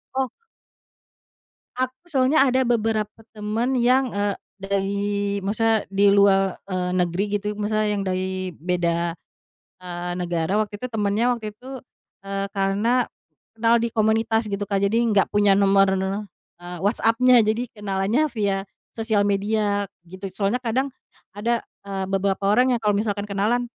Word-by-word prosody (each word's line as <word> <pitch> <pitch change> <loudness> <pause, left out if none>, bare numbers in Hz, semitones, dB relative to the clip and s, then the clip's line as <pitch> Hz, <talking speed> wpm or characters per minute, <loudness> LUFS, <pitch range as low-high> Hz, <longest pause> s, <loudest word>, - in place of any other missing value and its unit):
Oh. 265 -2 0 1.5
Aku 255 0 -2
soalnya 275 -1 +3
ada 260 +1 +2
beberapa 225 -3 0 0.2
teman 220 +5 -1
yang, 250 0 +2
eee, 205 -1 0 0.2
dari 200 +1 -1 0.3
maksudnya 220 +2 +1
di 200 +1 +3
luar, 195 -1 +4
eee, 185 -2 -2
negeri 180 +1 +1
gitu 210 +1 -4
maksudnya 215 0 0
yang 205 - -1
dari 185 0 -2
beda, 170 0 -1 0.7
eee, 175 -1 -5
negara 175 +3 0
waktu 210 -1 -2
itu 250 - -2
temennya 215 +2 +1
waktu 220 -3 -4
itu, 260 +3 -9 0.5
eee, 195 0 -2
karena 205 +5 +1 0.5
kenal 230 +1 +3
di 235 - 0
komunitas 220 +1 +2
gitu, 200 +1 -2
Kak. 200 -1 0
Jadi 215 +4 +2
enggak 205 -3 +2
punya 205 -1 +4
nomor, 195 0 +4
eee, 190 -2 -6
WhatsApp-nya, 230 +4 +4
jadi 220 +2 0
kenalannya 210 +7 0
via 205 -6 0 0.4
sosial 220 -2 +1
media 205 0 0 0.2
gitu. 185 +3 -8
Soalnya 200 +5 -1
kadang 260 +3 -1 0.4
ada, 230 +3 -1 0.2
eee, 195 -1 -3
beberapa 195 0 0
orang 250 +3 +4
yang - - -2
kalau 210 -1 +3
misalkan 205 0 -1
kenalan, 210 +5 0
205 Hz, 140 wpm, -23 LUFS, 195-230 Hz, 1.5 s, luar